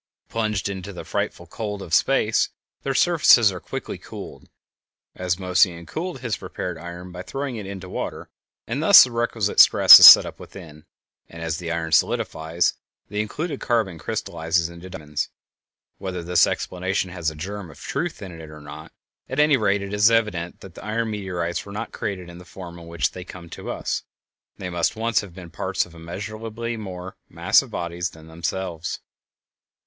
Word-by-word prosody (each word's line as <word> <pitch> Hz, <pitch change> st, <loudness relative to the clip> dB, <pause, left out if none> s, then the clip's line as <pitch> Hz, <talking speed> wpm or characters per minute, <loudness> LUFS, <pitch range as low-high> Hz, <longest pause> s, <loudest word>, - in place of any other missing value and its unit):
Plunged 110 Hz, -3 st, -1 dB
into 100 Hz, 0 st, -6 dB
the 90 Hz, -, -8 dB
frightful 85 Hz, -, -3 dB
cold 105 Hz, +2 st, -5 dB
of 80 Hz, -, -9 dB
space, 115 Hz, +1 st, +3 dB, 0.3 s
their 135 Hz, -1 st, -2 dB
surfaces 150 Hz, -, +5 dB
are 90 Hz, -, -6 dB
quickly -, -, -6 dB
cooled, -, -, -10 dB, 0.6 s
as 90 Hz, -1 st, -1 dB
Moissan 90 Hz, -2 st, +2 dB
cooled 175 Hz, -, -5 dB
his 115 Hz, -6 st, -2 dB
prepared 90 Hz, -1 st, -5 dB
iron 85 Hz, +1 st, -9 dB
by 90 Hz, 0 st, -7 dB
throwing 135 Hz, +5 st, -4 dB
it 105 Hz, -3 st, -6 dB
into 95 Hz, -2 st, -7 dB
water, -, -, -5 dB, 0.4 s
and 125 Hz, +6 st, -3 dB
thus 195 Hz, +5 st, +10 dB
the 130 Hz, -, -3 dB
requisite 115 Hz, -3 st, -1 dB
stress -, -, +10 dB
is -, -, +12 dB
set -, -, +11 dB
up -, -, -9 dB
within, 75 Hz, -5 st, -12 dB, 0.4 s
and, 85 Hz, 0 st, -9 dB
as 80 Hz, -1 st, -2 dB
the 85 Hz, -1 st, -4 dB
iron 80 Hz, -1 st, -3 dB
solidifies, 80 Hz, +1 st, +1 dB, 0.4 s
the 105 Hz, +1 st, -1 dB
included 145 Hz, +7 st, -4 dB
carbon 110 Hz, -9 st, 0 dB
crystallizes 80 Hz, +2 st, -1 dB
into 85 Hz, +2 st, -11 dB
diamonds. 75 Hz, -5 st, -4 dB, 0.7 s
Whether 90 Hz, -2 st, -5 dB
this 90 Hz, +1 st, +4 dB
explanation 95 Hz, 0 st, -2 dB
has 85 Hz, -3 st, -2 dB
a 80 Hz, -, -10 dB
germ 95 Hz, +3 st, -6 dB
of 75 Hz, -, -14 dB
truth -, -, -4 dB
in 95 Hz, -, -7 dB
it 80 Hz, -, -10 dB
or 75 Hz, 0 st, -11 dB
not, 75 Hz, +2 st, -10 dB, 0.4 s
at 130 Hz, -, -3 dB
any 150 Hz, -1 st, +5 dB
rate 100 Hz, -4 st, +1 dB
it 100 Hz, +1 st, -6 dB
is 105 Hz, +2 st, +5 dB
evident 105 Hz, -7 st, 0 dB
that 95 Hz, -3 st, -11 dB
iron 110 Hz, +1 st, -2 dB
meteorites 90 Hz, -4 st, -3 dB
were 100 Hz, -, -11 dB
not 105 Hz, -, -5 dB
created 100 Hz, -5 st, -5 dB
in 85 Hz, 0 st, -11 dB
the -, -, -12 dB
form 90 Hz, -1 st, -10 dB
in 85 Hz, -, -12 dB
which 85 Hz, 0 st, -1 dB
they 90 Hz, -, -8 dB
come 90 Hz, -2 st, -11 dB
to -, -, -8 dB
us; -, -, -2 dB, 0.6 s
they 90 Hz, -1 st, -6 dB
must 85 Hz, +3 st, 0 dB
once 115 Hz, 0 st, +1 dB
have 95 Hz, -4 st, -12 dB
been 90 Hz, -3 st, -10 dB
parts -, -, -1 dB
of 90 Hz, -, -17 dB
immeasurably 110 Hz, +7 st, -6 dB
more 95 Hz, -4 st, -8 dB
massive -, -, +2 dB
bodies 85 Hz, 0 st, -3 dB
than 80 Hz, -1 st, -15 dB
themselves. 85 Hz, +1 st, -4 dB
95 Hz, 180 wpm, -23 LUFS, 85-110 Hz, 0.7 s, is